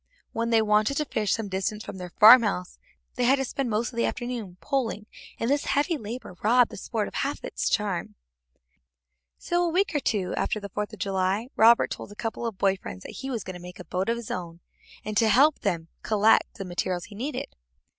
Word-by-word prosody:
When 230 0 -2
they 225 -1 +4
wanted 215 +5 +2
to 300 - 0
fish 210 -7 0
some 225 -2 -4
distance 195 +3 -2
down - - -14
from - - -7
their 180 -1 -6
farmhouse, 210 -3 +6 0.4
they 250 - +1
had 260 +3 +5
to 270 -1 -2
spend 270 0 -3
most 230 +3 -1
of - - -10
the 235 - +2
afternoon 240 -7 -4
poling, 235 -6 -2 0.3
and 230 - -1
this 285 +2 +1
heavy 295 +4 +1
labor 225 - -7
robbed 240 +3 +4
the - - -8
sport 215 +1 -2
of - - -10
half 280 - -2
its - - -2
charm. 200 -4 -1 1.2
So, 350 0 0
a 345 - +1
week 370 +3 +1
or 295 - +2
two 200 -9 -1
after 215 - -1
the 200 -1 -7
Fourth 210 +2 -4
of 215 - -10
July, 195 +4 -1
Robert 230 +2 +5
told - - -6
a - - -11
couple 225 +1 -3
of 220 -4 -5
boy 195 0 +2
friends 95 - -9
that - - -9
he 270 - -5
was 235 -5 -3
going 185 - -7
to 180 - -9
make 180 +1 -10
a 180 - -9
boat 185 +6 -2
of 235 - +1
his 235 -2 -7
own, 170 -1 -6 0.4
and 215 0 -4
got - - +4
them 225 - +3
to - - +3
help 280 +7 +4
him 170 -6 -1
collect 215 0 +3
the 195 - -6
materials 175 0 -2
he 210 - -13
needed. 260 +9 -5
215 Hz, 235 wpm, -26 LUFS, 195-245 Hz, 1.2 s, farmhouse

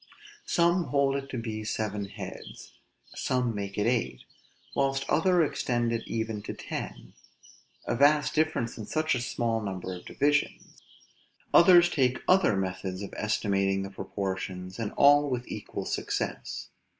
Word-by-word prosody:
Some 170 +1 +3
hold 140 0 +1
it 135 0 -4
to 130 - -4
be 110 -2 -4
seven 105 -1 -2
heads; 100 - -9 0.4
some 125 -2 0
make 100 -1 -5
it 105 - +1
eight; 120 0 0 0.5
whilst 135 0 0
others 170 0 +3
extend 120 -3 -1
it 115 - -3
even 110 -2 -3
to - - -6
ten: - - -7 0.7
a - - -1
vast 145 +3 +4
difference 155 -8 0
in 105 - -6
such 155 0 +1
a 125 - -1
small 115 -2 -1
number 95 -2 -4
of 90 - -9
divisions! 145 +1 0 0.7
Others 175 0 +8
take 130 -4 +1
other 185 - +4
methods 95 0 -3
of 100 - -8
estimating 100 -2 0
the 95 - -6
proportions, 95 -1 -5
and 110 -2 -2
all 145 +1 +5
with 125 -1 -3
equal - - -6
success. - - -3
115 Hz, 145 wpm, -28 LUFS, 100-140 Hz, 0.7 s, Others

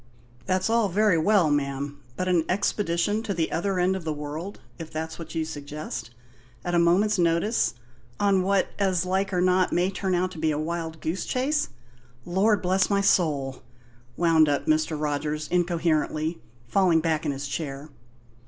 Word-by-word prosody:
"That's 185 0 +1
all 225 -2 +2
very 200 -2 +3
well, 180 -3 +3
ma'am, 140 0 -2 0.2
but 185 - -2
an 175 -3 +3
expedition 200 +1 0
to 205 -3 -3
the 165 -1 -1
other 195 +3 -1
end 180 +1 +2
of 190 - -5
the 160 - -2
world 150 +6 -6 0.2
if 165 -1 -7
that's 160 +1 -5
what 165 -1 -8
you 160 -1 0
suggest? 145 -4 -6 0.6
at 175 - -2
a 175 - +4
moment's 185 +5 +3
notice 170 - +1 0.4
on 200 -2 +3
what, 195 0 +1
as 185 -3 +1
like 190 +2 0
or 180 -1 +1
not, 185 0 +3
may 180 +2 +1
turn 190 -1 -1
out 180 +1 0
to 170 - -9
be 160 0 +1
a 150 - 0
wild 160 0 -4
goose 165 +4 -2
chase 280 +4 0 0.6
Lord 195 +3 +2
bless 190 +2 +2
my 200 -1 +2
soul!" 150 -9 +1 0.6
wound 165 -3 +4
up 145 -1 0
Mr. 155 0 +1
Rogers 150 +1 -2
incoherently, 165 -2 0 0.3
falling 175 +3 +3
back 160 -1 0
in 150 - 0
his 140 +1 -5
chair. 140 0 -5
170 Hz, 170 wpm, -26 LUFS, 155-190 Hz, 0.6 s, a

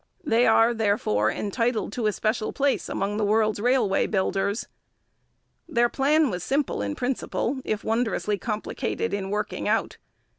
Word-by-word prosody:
They 240 -5 +3
are, 225 +1 +5
therefore, 200 - +1
entitled 220 - -1
to 230 -3 0
a - - +3
special 215 +2 -1
place 280 -1 0
among 200 +1 -2
the 215 - 0
world's 215 0 +2
railway 245 -4 +2
builders. 200 +1 -1 1.0
Their 240 -5 +3
plan 290 +1 +2
was 180 -1 -4
simple 275 - 0
in 100 -1 -2
principle, 260 +1 -2
if 215 0 -2
wondrously 220 -3 0
complicated 215 +1 -3
in 195 -1 -2
working 210 +1 -2
out. - - 0
220 Hz, 145 wpm, -25 LUFS, 205-245 Hz, 1.0 s, are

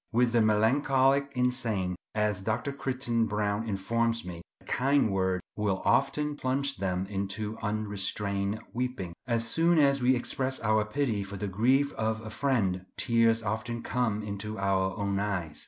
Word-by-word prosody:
With 120 +1 +3
the 120 -1 +3
melancholic 135 +5 +3
insane, 120 -7 0 0.2
as 105 -3 0
Dr. 110 +7 -1
Crichton 125 -4 -1
Browne 105 +1 -1
informs 115 +4 0
me, 85 -2 -7 0.2
a - - -23
kind 135 -3 +2
word 95 -1 0
will 100 -3 -1
often 150 0 +2
plunge 135 0 -1
them 95 -1 -1
into 100 +2 -3
unrestrained 105 -1 -1
weeping. 125 -8 -3
As 115 -1 0
soon 165 +7 +3
as 140 -2 +4
we 130 +1 +4
express 130 +2 -2
our 110 -1 +2
pity 110 -3 -1
for 100 +1 -7
the 105 - -3
grief 130 +9 +2
of 110 0 -1
a 110 -1 -8
friend, 100 -9 0
tears 115 -1 +3
often 110 +3 -3
come 110 -4 -1
into 105 +1 -5
our 95 -1 0
own 100 -1 -1
eyes. 90 -7 -2
110 Hz, 155 wpm, -29 LUFS, 100-125 Hz, 0.2 s, as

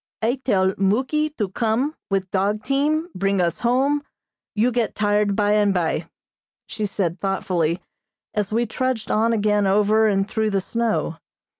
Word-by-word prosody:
"I 245 +4 0
tell 190 -5 +2
Muky 260 +10 +1
to 210 -4 -1
come 230 +8 0 0.2
with 195 -2 -1
dog 200 +2 0
team, 305 +5 0
bring 195 +1 0
us 170 -1 0
home, 270 +5 +2 0.5
you 230 +4 +2
get 235 -1 -1
tired 205 -1 +1
by 205 0 +2
and 205 -2 +3
by," 165 -1 -1 0.6
she 215 -1 -3
said 180 -3 -2
thoughtfully, 180 -3 -1 0.5
as 210 -1 -1
we 235 +2 +1
trudged 240 -1 -2
on 225 +2 +2
again 210 -2 +2
over 210 +2 +3
and 195 -1 +1
through 220 0 0
the 200 -2 +1
snow. 190 -7 -1
210 Hz, 155 wpm, -22 LUFS, 195-235 Hz, 0.6 s, and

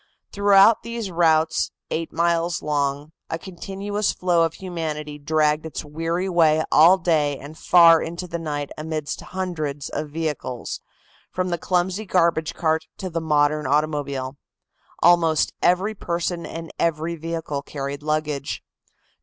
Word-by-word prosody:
Throughout 200 +2 +5
these 230 -3 -5
routes, 160 -2 +2 0.2
eight 165 0 -2
miles 170 +1 0
long, 145 0 -1 0.2
a 165 - -2
continuous 195 +4 -3
flow 175 -2 +1
of 165 -1 +1
humanity 155 -5 -5
dragged 150 +1 +1
its 160 -1 -6
weary 165 +5 -2
way 160 -3 +3
all 170 +5 +7
day 150 -6 +1
and 145 +3 -10
far 165 -1 +6
into 170 +2 -5
the 170 -1 -4
night 145 -3 -4
amidst 155 -1 -4
hundreds 155 -7 -4
of 150 - -4
vehicles, 150 -6 -4 0.5
from 185 0 -1
the 175 -1 -2
clumsy 185 +4 -1
garbage 170 -3 +1
cart 160 -1 0
to 185 -2 -5
the 165 0 -2
modern 150 -1 +2
automobile. 140 -2 -1 0.7
Almost 165 -3 +4
every 185 +5 +2
person 170 -2 -3
and 165 0 -7
every 165 0 0
vehicle 165 -3 -4
carried 140 0 -5
luggage. 150 -1 -2
165 Hz, 135 wpm, -23 LUFS, 150-175 Hz, 0.7 s, all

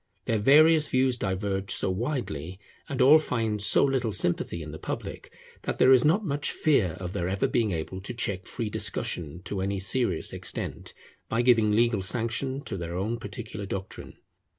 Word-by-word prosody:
Their 110 - 0
various 155 +6 +5
views 130 -1 +2
diverge 95 0 -2
so 95 - +1
widely, 95 - -4 0.3
and 135 -3 +1
all 150 +4 +8
find 115 -7 -2
so 105 - +5
little 130 -5 0
sympathy 85 -3 0
in 75 - -8
the 80 - -9
public, - - -6 0.3
that - - -4
there 130 - +5
is 130 -2 +6
not 185 +8 +2
much 145 -2 -1
fear 110 - +1
of 90 -1 -6
their 90 +1 -2
ever 95 +1 0
being 115 -3 +1
able 90 +2 -4
to 100 - -5
check 100 -5 -2
free 115 -4 -4
discussion 85 -3 -3
to 95 0 -4
any 100 +1 -2
serious 120 +6 +1
extent, - - -5 0.3
by 115 +2 +1
giving 115 -4 +4
legal 115 -2 +2
sanction 120 +6 -1
to 100 - -5
their 85 -1 -5
own 110 +6 -2
particular 110 -4 -7
doctrine. 95 0 -7
110 Hz, 175 wpm, -27 LUFS, 95-130 Hz, 0.3 s, all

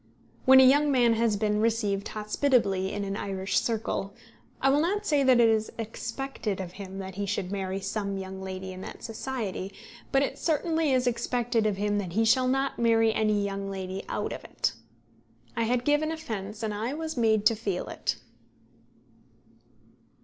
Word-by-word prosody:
When 265 0 +9
a - - +9
young 290 +3 +5
man 240 -3 +4
has 225 -2 +1
been 210 0 +1
received 215 -3 0
hospitably 210 -3 +1
in 205 - -3
an 195 0 -3
Irish 195 -1 -1
circle, 215 -3 -2 0.4
I 270 - +3
will 285 - +4
not 400 +6 0
say 295 -5 +3
that 260 -2 +5
it 235 - +6
is 220 -1 +1
expected 230 -1 -4
of 180 -2 -5
him 190 0 -8
that 190 -1 -6
he 200 +2 -3
should 190 -2 -2
marry 190 -1 -2
some 200 0 -3
young 190 0 -6
lady 190 0 -5
in 185 - -9
that - - -9
society; 220 -5 -4 0.4
but 270 0 +4
it - - -3
certainly 320 -1 +1
is 255 -1 +2
expected 240 -2 0
of 205 -2 -1
him 205 0 0
that 180 -4 -4
he 225 +3 +2
shall 255 +3 +4
not 270 +1 0
marry 225 -1 +4
any 215 -2 +1
young 195 0 -3
lady 190 0 -4
out - - -2
of - - -8
it. - - -1 0.8
I 230 -1 +1
had 245 +1 0
given 295 +2 +2
offence, 220 -9 -5
and 215 -1 -1
I 225 +7 -2
was 320 0 -4
made 220 -3 +2
to 230 - +5
feel 205 -4 -3
it. - - -2
220 Hz, 180 wpm, -28 LUFS, 195-255 Hz, 0.8 s, When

